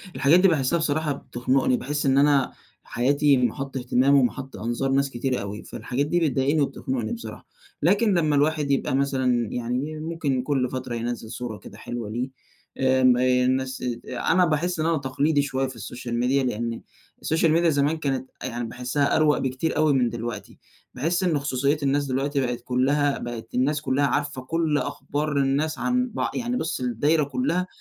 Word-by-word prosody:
الحاجات 155 +6 +5
دي 195 - +6
باحسّها 160 0 +2
بصراحة 155 -1 0
بتخنقني، 130 0 0
باحس 145 +2 -2
إن 135 0 +3
أنا 140 -2 +3 0.3
حياتي 140 +3 +2
مَحَطّ 135 +3 -1
اهتمام 130 +2 +3
ومَحَطّ 130 0 0
أنظار 120 +4 -2
ناس 140 +1 +2
كتير 125 -1 -2
أوي، 100 +1 -6
فالحاجات 125 +6 -3
دي 175 +3 +1
بتضايقني 145 0 +1
وبتخنقني 130 -4 -2
بصراحة، 110 -1 -8 0.3
لكن 200 +6 +3
لمّا 155 -4 +2
الواحد 150 0 +1
يبقى 135 -1 +1
مثلًا 130 -4 +1
يعني 125 +6 -3
ممكن 155 -5 -1
كل 130 -3 0
فترة 130 -2 -4
ينزّل 115 -1 -4
صورة 120 -4 -5
كده 100 +1 -13
حلوة 115 -1 -6
ليه، 125 +4 -3 0.5
آمم، 130 -1 +4
آآ، 125 0 +3
الناس 130 0 -1
ات 120 -1 -4
أنا 165 +8 +2
باحس 170 +2 0
إن 155 - 0
أنا 165 -1 +2
تقليدي 140 +2 +1
شوية 135 -1 -1
في 130 - -9
الSocial 120 +3 -7
Media 135 +1 +2
لإن 115 0 -3 0.4
الSocial 160 +1 +2
Media 170 +1 +3
زمان 145 0 +2
كانت 135 -4 -2
أ - - -3
يعني 120 -1 -3
باحسها 125 +4 0
أروَق 155 -2 +4
بكتير 130 +5 -2
أوي 155 -1 +4
من 125 -3 +2
دلوقتي، 120 0 -6 0.3
باحس 165 +8 0
إن 165 -5 +2
خصوصيات 140 +1 0
الناس 140 +1 +1
دلوقتي 140 +2 -1
بقِت 125 -1 -2
كلّها 140 +3 +1
بقِت 120 -2 -7
الناس 145 +4 +1
كلّها 140 +1 +1
عارفة 140 0 -1
كُلّ 160 +2 0
أخبار 145 +1 -2
الناس 140 +3 +1
عن 250 0 +1
بع - - -1
يعني 245 0 -2
بُصّ 160 - -2
الدايرة 145 +6 +2
كلّها 180 - -1
135 Hz, 175 wpm, -24 LUFS, 125-150 Hz, 0.5 s, دي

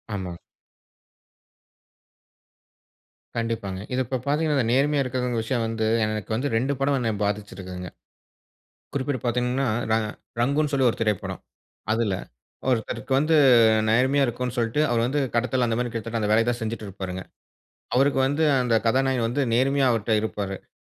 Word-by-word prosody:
ஆமா. 90 -3 -5 3.0
கண்டிப்பாங்க. 115 -5 -2
இத 125 - 0
இப்ப 130 +2 -2
பார்த்தீங்கன்னா, 150 +1 +1
இந்த 125 -4 +1
நேர்மையா 140 +2 +3
இருக்கிறவங்க 125 -2 -1
விஷயம் 120 +1 -1
வந்து 110 -1 -2 0.2
எனக்கு 110 -2 -3
வந்து 135 +5 -1
2 130 +5 +1
படம் 140 0 +2
என்ன 115 -2 0
பாதிச்சிருக்குதுங்க. 95 -3 -4 1.1
குறிப்பிட்டு 135 -2 -1
பாத்தீங்கன்னா, 125 +3 0 0.2
ர - - +4 0.5
ரங்குன்னு 145 +4 +1
சொல்லி 135 -2 +3
ஒரு - - -7
திரைப்படம். 105 -3 -2 0.5
"அதில 110 -3 +1 0.6
ஒருத்தருக்கு 115 +1 -2
வந்து 155 +3 +2 0.6
நேர்மையா 130 +5 +3
இருக்கனு 125 0 -3
சொல்ட்டு 115 +4 0
அவரு 120 -1 +2
வந்து 145 +4 0
கடத்தல் 125 +1 +1
அந்தமாரி 120 +1 -1
கிட்டத்தட்ட 115 0 -4
அந்த 105 -1 0
வேலைய 115 +2 +4
தான் 120 0 0
செஞ்சிட்டு 110 -1 -4
இருப்பாருங்க. 95 -1 -6 0.7
அவருக்கு 135 +1 +3
வந்து 145 +4 +1 0.2
அந்த 125 -2 0
கதாநாயகன் 130 0 +2
வந்து 125 +5 0
நேர்மையா 135 +3 +3
அவர்ட்ட 115 -1 0
இருப்பாரு. 100 -3 -3
அ. - - -36
120 Hz, 140 wpm, -25 LUFS, 110-135 Hz, 3.0 s, ர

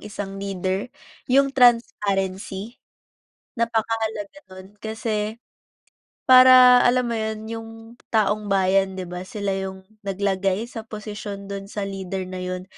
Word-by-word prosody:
isang 200 -1 -7
leader, 190 +1 -2 0.4
yung 275 +1 +3
transparency. 205 -4 +1 0.8
Napakahalaga 225 0 -2 0.2
nun 185 0 -11
kasi 220 0 -3 0.9
para, 255 -1 +9
alam 250 +1 +3
mo - - -1
yun, 220 0 -3
yung 225 0 -6 0.4
taong 210 -1 +1
bayan 195 0 +2
'di 185 - -4
ba, 180 +1 -6
sila 200 -4 -3
yung 190 0 -6 0.2
naglagay 195 +1 0
sa 225 -1 -8
posisyon 205 -2 -7
dun 195 0 -6
sa 205 -1 -4
leader 195 -1 -4
na 185 0 -7
yun 180 0 -4
205 Hz, 120 wpm, -23 LUFS, 195-225 Hz, 0.9 s, para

